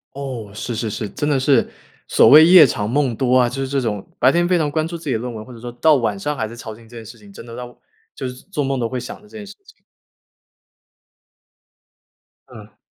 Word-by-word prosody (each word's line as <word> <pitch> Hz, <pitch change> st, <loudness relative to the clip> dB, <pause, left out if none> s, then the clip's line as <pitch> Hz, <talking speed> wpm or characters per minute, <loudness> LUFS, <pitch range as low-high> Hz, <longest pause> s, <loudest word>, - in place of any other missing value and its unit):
哦， 130 Hz, -7 st, -6 dB
是 115 Hz, +2 st, -5 dB
是 110 Hz, +1 st, -3 dB
是， 105 Hz, 0 st, -5 dB
真 145 Hz, -, -3 dB
的 145 Hz, -2 st, +2 dB
是 130 Hz, -2 st, +2 dB, 0.4 s
所 -, -, +5 dB
谓 155 Hz, +3 st, +9 dB
“夜 175 Hz, -3 st, +8 dB
长 105 Hz, -4 st, -3 dB
梦 130 Hz, 0 st, 0 dB
多” 130 Hz, +2 st, +1 dB
啊， 125 Hz, -1 st, +3 dB
就 135 Hz, +2 st, -5 dB
是 135 Hz, -, -3 dB
这 140 Hz, 0 st, -1 dB
种 105 Hz, -5 st, -4 dB
白 130 Hz, +2 st, +4 dB
天 175 Hz, +2 st, +2 dB
非 180 Hz, -, +3 dB
常 150 Hz, -3 st, -1 dB
关 155 Hz, +1 st, -1 dB
注 170 Hz, -, -6 dB
自 165 Hz, -, -12 dB
己 140 Hz, -, -2 dB
的 110 Hz, -, 0 dB
论 125 Hz, +1 st, -5 dB
文， 110 Hz, -1 st, -8 dB
或 125 Hz, -, -13 dB
者 115 Hz, -, -12 dB
说 120 Hz, +1 st, -7 dB
到 150 Hz, +5 st, +3 dB
晚 110 Hz, -6 st, -1 dB
上 150 Hz, +9 st, -3 dB
还 110 Hz, -2 st, -3 dB
在 115 Hz, -, -11 dB
操 110 Hz, -3 st, -8 dB
心 115 Hz, 0 st, -17 dB
这 120 Hz, -, -14 dB
件 115 Hz, -, -9 dB
事 115 Hz, +1 st, -13 dB
情， 100 Hz, -1 st, -17 dB
真 100 Hz, -, -11 dB
的 115 Hz, -1 st, -11 dB
到 125 Hz, 0 st, -9 dB, 0.4 s
就 130 Hz, -, -6 dB
是 125 Hz, -, -7 dB, 0.2 s
做 150 Hz, -7 st, -2 dB
梦 135 Hz, -1 st, -2 dB
都 115 Hz, -, -1 dB
会 130 Hz, +2 st, -4 dB
想 125 Hz, +2 st, -7 dB
着 210 Hz, -, -20 dB
这 220 Hz, -, -14 dB
件 210 Hz, -, -8 dB
事 200 Hz, -, -11 dB
情。 440 Hz, -, -21 dB, 2.7 s
嗯。 -, -, -14 dB
125 Hz, 275 characters per minute, -19 LUFS, 115-145 Hz, 2.7 s, 谓